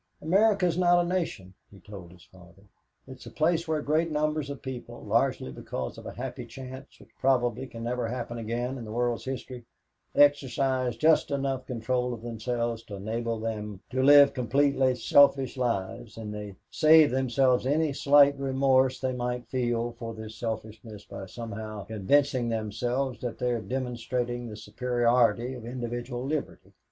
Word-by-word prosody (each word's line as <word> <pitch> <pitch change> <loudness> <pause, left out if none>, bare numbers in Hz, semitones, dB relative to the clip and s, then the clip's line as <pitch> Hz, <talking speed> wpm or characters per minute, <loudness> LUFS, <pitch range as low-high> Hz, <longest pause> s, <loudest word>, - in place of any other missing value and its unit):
"America 195 +4 +3
is 175 0 0
not 175 -1 +4
a - - -4
nation," 165 - -3 0.2
he 100 - -16
told 95 -5 -11
his 90 -2 -17
father; 95 +1 -18 0.4
"it's 130 -1 -11
a - - -6
place 165 +2 +1
where 155 -2 -1
great 160 +3 +1
numbers 150 -1 -1
of 140 -2 -6
people, 130 -2 -7
largely 65 - +1
because 65 0 -5
of - - -10
a - - -6
happy 125 0 -6
chance 130 +2 -10
which - - -18
probably 130 -1 +1
can 115 -1 -9
never 120 0 -2
happen 120 0 -4
again 120 +4 -3
in - - -7
the 110 - -8
world's 120 +1 -1
history, 130 -1 -6 0.5
exercise 135 -3 +2
just 160 +1 +4
enough 135 -2 -2
control 125 0 -1
of 115 - -13
themselves 115 0 -3
to 105 - -9
enable 115 +3 -3
them 105 -3 -4
to 130 +1 0
live 140 +1 +7
completely 130 +1 +2
selfish 135 +2 +4
lives 115 -2 -3
and 105 -2 -6
they 105 -2 -7 0.2
save 155 -2 +6
themselves 130 0 +2
any 150 +1 +1
slight 140 0 +5
remorse 130 -1 +2
they 130 -1 -1
might 125 -1 -3
feel 120 -2 -1
for 115 -1 -7
this 110 0 -8
selfishness 110 -1 -6
by 95 - -8
somehow 110 -1 -7
convincing 125 +4 +1
themselves 120 +3 -2
that 120 -2 -4
they 125 - 0
are 120 -2 -1
demonstrating 120 -1 -3
the 105 -2 -8
superiority 120 0 +1
of 125 -3 -9
individual 120 +1 -5
liberty. 150 +1 -4
125 Hz, 165 wpm, -28 LUFS, 115-135 Hz, 0.5 s, live